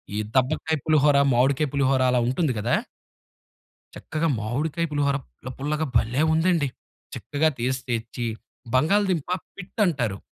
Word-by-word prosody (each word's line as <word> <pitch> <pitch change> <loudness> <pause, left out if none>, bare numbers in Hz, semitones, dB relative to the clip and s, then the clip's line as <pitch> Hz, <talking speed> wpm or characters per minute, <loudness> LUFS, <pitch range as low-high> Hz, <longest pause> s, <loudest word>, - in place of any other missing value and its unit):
ఈ - - -1 0.2
దబ్బకాయ 135 +5 +1
పులిహోర, 150 -2 +4 0.2
మామిడికాయ 135 +5 +2
పులిహోర 135 -1 +2
అలా 125 - +3
ఉంటుంది 130 +2 0
గదా! 115 +4 +1 1.2
చక్కగా 155 +1 -2
మామిడికాయ 145 +9 -1
పులిహోర 140 -2 +1
పుల్ల 130 - -11
పుల్ల‌గా 150 +3 -1
భలే 120 +6 +1
ఉందండి! 160 -2 +2 0.5
చక్కగా 155 +2 0
తేసి 130 +2 -1
తెచ్చి 120 +1 -3 0.5
బంగాళదుంప 175 +3 +2 0.3
పిట్ 190 +3 -10
అంటారు. 120 - -1
140 Hz, 120 wpm, -24 LUFS, 125-160 Hz, 1.2 s, పులిహోర